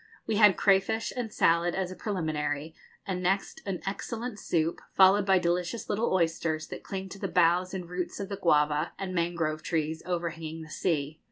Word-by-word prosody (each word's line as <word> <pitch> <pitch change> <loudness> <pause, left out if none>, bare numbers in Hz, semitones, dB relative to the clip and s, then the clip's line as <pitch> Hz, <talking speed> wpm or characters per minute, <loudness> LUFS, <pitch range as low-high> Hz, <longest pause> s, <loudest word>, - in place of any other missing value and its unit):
We 215 - 0
had 210 -4 +6
crayfish 215 +3 +2
and 240 -3 -3
salad 170 -1 +2
as 185 -1 -2
a - - -7
preliminary, 155 -6 -2 0.3
and 185 -2 -2
next, 195 - -1
an 190 -2 -2
excellent 220 +3 -4
soup 165 -2 0
followed 195 +1 +6
by 190 -1 +5
delicious 180 +6 -1
little 220 +3 0
oysters, 165 -3 0
that - - -7
cling 190 -1 -5
to 195 - -9
the - - -2
boughs 180 +1 +3
and 180 -2 -5
roots 180 +2 -4
of 200 - -3
the 200 0 -5
guava 150 -3 +2
and 190 -1 -4
mangrove 170 -3 -1
trees 160 -1 -2
overhanging 165 -2 -4
the 155 - -12
sea. 155 -3 -1
180 Hz, 180 wpm, -29 LUFS, 165-195 Hz, 0.3 s, had